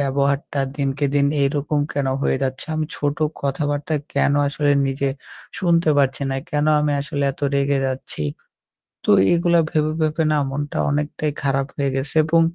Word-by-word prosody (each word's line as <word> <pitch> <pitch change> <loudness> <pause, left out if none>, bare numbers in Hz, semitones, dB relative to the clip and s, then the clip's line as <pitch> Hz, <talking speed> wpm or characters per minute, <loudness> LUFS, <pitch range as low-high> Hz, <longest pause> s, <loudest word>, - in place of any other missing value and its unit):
ব্যবহারটা 140 +1 0 0.2
দিনকে 140 0 0
দিন 140 0 +4 0.2
এইরকম 145 +1 0
কেন 140 -2 -1 0.2
হয়ে - - +2
যাচ্ছে? 130 0 -3
আমি 155 0 -1
ছোট 145 0 -1 0.3
কথাবার্তায় 145 +1 -1
কেন - - +3 0.2
আসলে 145 0 0 0.2
নিজে 135 0 -1 0.5
শুনতে 170 -4 +3
পাচ্ছি 135 0 +1
না? 135 - -1
কেন 150 0 +1
আমি 150 -1 +1
আসলে 145 0 -3
এত - - -20
রেগে 140 0 +2
যাচ্ছি? 130 -11 -4 0.8
তো - - -2 0.2
এগুলা 170 0 +3
ভেবে, 155 0 +1
ভেবে 155 +1 +1
না 150 - +2
মনটা 145 +2 -4
অনেকটাই 150 +1 -1
খারাপ 135 -1 +1
হয়ে 140 -1 0
গেছে 135 +3 -3
এবং 165 +1 +4
145 Hz, 160 wpm, -21 LUFS, 140-150 Hz, 0.8 s, দিন